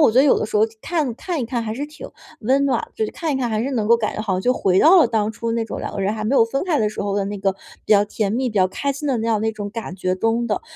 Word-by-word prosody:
我 225 - +5
觉 250 - +3
得 275 - +4
有 280 - +4
的 - - -2
时 215 - -2
候 210 - +4 0.2
看 310 -8 -1
看 340 -2 -3
一 - - -1
看 235 +1 -2
还 220 0 -3
是 285 +4 -3
挺 300 +1 -10 0.3
温 265 +5 +2
暖， 260 -4 0
就 220 - -1
是 - - -4
看 325 -3 -3
一 - - 0
看 250 -3 -1
还 215 -1 0
是 265 +4 -2
能 220 -4 -1
够 235 - +6
感 215 -2 -2
觉 - - -3
好 200 -4 -1
像 185 - -1
就 250 +5 +2
回 190 -6 +2
到 350 +4 +7
了 245 - +4
当 220 -2 0
初 230 +1 -4
那 230 0 0
种 225 - -6
两 - - -5
个 - - -4
人 200 +2 0
还 215 - -5
没 265 +6 +1
有 225 - +6
分 270 +5 -2
开 330 -6 +1
的 215 - +2
时 210 - -5
候 200 0 -1
的 200 - 0
那 205 +1 -4
个 195 0 +1 0.3
比 - - +3
较 205 0 +5
甜 205 -1 -2
蜜、 255 +3 0
比 - - -13
较 190 -2 +4
开 280 +8 -2
心 290 +2 -6
的 260 - +1
那 225 - -2
样 215 -2 +1
那 220 - 0
种 205 -1 -6
感 225 -4 -6
觉 185 -1 -1
中 225 +4 0
的。 210 - 0
225 Hz, 380 characters per minute, -21 LUFS, 210-265 Hz, 0.3 s, 到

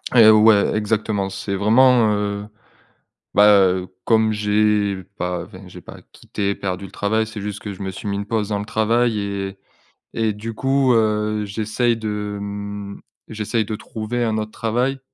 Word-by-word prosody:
Et 115 - +8
heu, 110 - +9
ouais, 105 -1 +5
exactement. 105 -2 -1
C'est 100 +1 -4
vraiment, 115 +2 +4
heu, 105 0 -2 0.9
bah, 105 +1 +6 0.2
heu, 90 0 -1 0.2
comme 110 -1 +3
j'ai 105 -2 +1
pas, 90 -1 -2
enfin, 95 +1 -13
j'ai - - -12
pas - - -12 0.2
quitté 100 -1 -3
perdu 95 0 -4
le - - -12
travail, 110 +2 0
c'est 110 -2 -7
juste 105 0 -5
que 100 -2 -6
je 95 - -11
me 95 0 -3
suis 95 +2 -8
mis 100 - -1
une 100 0 -3
pause 110 -1 -2
dans 100 -1 -1
le 105 - -5
travail 110 +1 +1
et 100 -1 -4 0.6
et 110 -2 0
du 110 +2 -6
coup, 135 0 +2
heu, 105 -1 +1
j'essaie 110 +3 0
de 105 -2 -4
m 100 0 -6 0.3
j'essaie 110 +1 -1
de 105 +1 -4
trouver 115 +3 -4
un 110 -1 0
autre 110 0 -4
travail 125 +4 -1
105 Hz, 180 wpm, -21 LUFS, 100-110 Hz, 0.9 s, heu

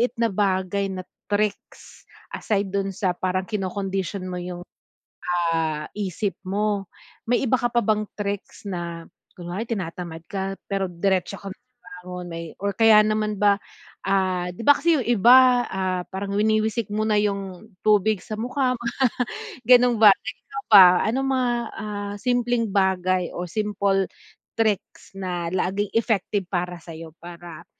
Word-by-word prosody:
maliit 240 0 +1
na 230 - +3
bagay 195 0 0
na 185 -1 -5 0.3
tricks 205 0 -3 0.2
aside 200 -2 -1
don 195 0 -2
sa 185 0 0
parang 185 +1 -1
kinokondisyon 195 -1 -3
mo 180 - -4
yung, 175 0 -6 0.9
ah, 155 -2 -1
isip 195 -1 -2
mo? 200 0 -1 0.3
May 245 +1 +1
iba 255 - +4
ka 240 -2 -1
pa 240 - +3
bang 215 -1 +1 0.2
tricks 200 0 -5
na 170 -3 -5 0.3
kunwari 175 +4 -5
tinatamad 175 -6 -5
ka 195 0 -4
pero 195 -1 -1
diretso 185 +1 0
ka 200 - -10
bumangon 180 -1 -11
may 165 0 -5
or 200 +1 -1
kaya 225 -2 +7
naman 215 0 0
ba, 205 -1 +4 0.5
ah, 185 -2 +1
'di 180 - -9
ba 285 - +10
kasi 335 +2 +2
yung 250 - -4
iba, 245 +2 +6
ah, 185 -1 -1
parang 195 +1 -4
winiwisik 215 +1 +1
mo 215 +1 0
na 215 - +2
yung 200 0 -3
tubig 215 -1 +3
sa 215 - -5
mukha 255 +2 0 0.9
ganon 245 -2 +5
ba? 210 - +10
Ikaw 270 +4 -8
ba 200 -3 +10 0.2
anong 265 +5 0
mga, 255 -2 +1 0.3
ah, 205 -1 -5
simpleng 245 -2 +1
bagay 185 -2 +1
o 180 - -3
simple 200 0 0 0.5
tricks 215 -4 -1
na 180 -3 -3
laging 195 +2 -1
effective 210 -4 0
para 180 -1 -2
sa'yo 165 -1 -10
para 170 -1 -10
200 Hz, 145 wpm, -24 LUFS, 185-215 Hz, 0.9 s, ba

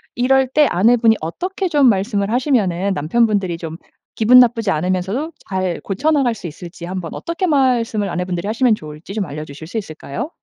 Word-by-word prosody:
이럴 265 +2 +3
때 295 +3 +3
아내분이 225 +4 +4
어떻게 370 - -3
좀 290 -6 +3
말씀을 200 0 +1
하시면은 200 - +1
남편분들이 190 +1 +1
좀 165 -1 -7 0.4
기분 240 +3 +6
나쁘지 230 -4 +3
않으면서도 185 - -1 0.2
잘 185 -2 -2
고쳐나갈 265 +3 +1
수 180 - -7
있을지 170 +2 -9
한번 180 -2 -5
어떻게 345 +2 -3
말씀을 240 - +1
아내분들이 180 +2 -3
하시면 230 +1 +2
좋을지 155 +1 -10
좀 210 -2 -2
알려주실 150 0 -8
수 205 - -5
있을까요? 200 - -5
210 Hz, 415 characters per minute, -19 LUFS, 175-250 Hz, 0.4 s, 기분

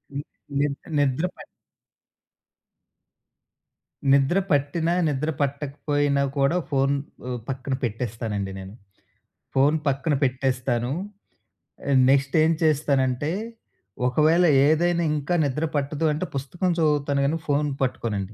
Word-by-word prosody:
ని 140 - -2 0.4
నిద్ 145 -1 0 0.2
నిద్ర 145 +3 +1
పట్ - - -11 2.7
నిద్ర 140 +6 +3
పట్టినా, 155 +4 +1 0.2
నిద్ర 150 +2 -1
పట్టకపోయినా 145 0 0
కూడా, 140 +5 +2
ఫోన్ 135 0 +2 0.3
ఉ - - -4 0.2
పక్కన 135 0 -3
పెట్టేస్తానండి 110 -4 -3
నేను. 95 +1 -9 0.8
ఫోన్ 140 +3 +4
పక్కన 140 +3 +1
పెట్టేస్తాను. 125 -2 0 1.0
ఆహ్, 135 -2 +4
నెక్స్ట్ 135 0 +2
ఏం 160 - +3
చేస్తానంటే, 140 -2 +1 0.8
ఒకవేళ 155 +7 +4 0.2
ఏదైనా 170 +2 +2
ఇంకా 150 +4 -2
నిద్ర 145 +3 -1
పట్టదు 145 +2 0
అంటే, 160 +5 -3
పుస్తకం 170 +7 -1
చదువుతాను, 145 -3 +1
కాని 160 +4 0
ఫోన్ 145 +1 +2
పట్టుకోనండి. 110 -5 -2
140 Hz, 105 wpm, -24 LUFS, 130-150 Hz, 2.7 s, ఫోన్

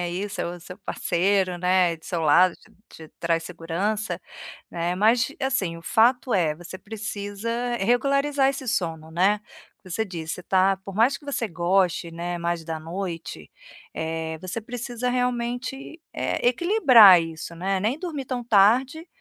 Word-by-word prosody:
aí, 180 +4 -3
seu 175 -2 -4
seu 180 +2 -10
parceiro, 185 -1 0
né, 180 -2 +2
do 160 - -23
seu 175 - -3
lado, 170 +4 +5
te - - -23 0.2
te 160 -1 -13
traz 165 -1 0
segurança, 180 +3 -3 0.5
né, 170 +1 -2
mas 230 +4 +3
assim, 200 -11 -1
o - - -11
fato 240 +6 +2
é, 160 -5 +2
você 175 +3 -9
precisa 205 +1 -6 0.3
regularizar 275 +5 +2
esse 265 -2 -5
sono, 160 -6 -2
né. 190 +5 +2 0.4
Você 190 +5 -3
disse, 165 -4 -5
você 180 - -10
tá 190 0 +2
por 195 0 -10
mais 235 +6 +3
que 290 - -19
você 255 -5 -2
goste, 175 -1 +1
né, 175 +1 -4
mais 170 -1 -2
da 160 0 -5
noite, 165 - -6 0.5
eh, 160 0 -3
você 185 +5 -5
precisa 245 +1 -4
realmente, 250 +4 -3
eh, - - -1
equilibrar 255 - +7
isso, 165 +1 -7
né, 190 +3 -1
nem 230 +7 0
dormir 320 -7 -4
tão 250 -1 -4
tarde, 245 - +3
195 Hz, 155 wpm, -24 LUFS, 170-240 Hz, 0.5 s, equilibrar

